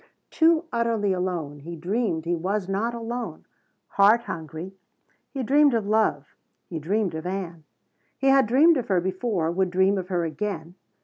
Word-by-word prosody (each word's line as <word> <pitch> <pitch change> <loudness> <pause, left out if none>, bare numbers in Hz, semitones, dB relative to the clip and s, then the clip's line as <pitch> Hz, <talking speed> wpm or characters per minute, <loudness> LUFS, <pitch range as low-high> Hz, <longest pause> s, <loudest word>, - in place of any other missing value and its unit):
Too 325 0 +3
utterly 230 -4 0
alone, 175 -6 -3
he 170 +4 -8
dreamed 175 -1 -2
he 175 - 0
was 190 +3 -2
not 215 +5 -1
alone. 235 +1 -5 0.4
Heart 210 +4 +4
hungry, 165 -1 -7 0.6
he 270 -2 -4
dreamed 285 +1 +4
of 220 -3 0
love. 205 -9 0 0.3
He 165 - -6
dreamed 190 +3 -1
of 160 +2 -5
Ann. 175 -4 -5 0.5
He - - -4
had 270 -4 +5
dreamed 300 +8 +5
of 250 - -3
her 190 -3 +2
before, 185 -2 -1
would 190 +1 0
dream 190 +2 +2
of 180 - -6
her 175 -3 -1
again. 170 0 -4
195 Hz, 165 wpm, -25 LUFS, 170-230 Hz, 0.6 s, had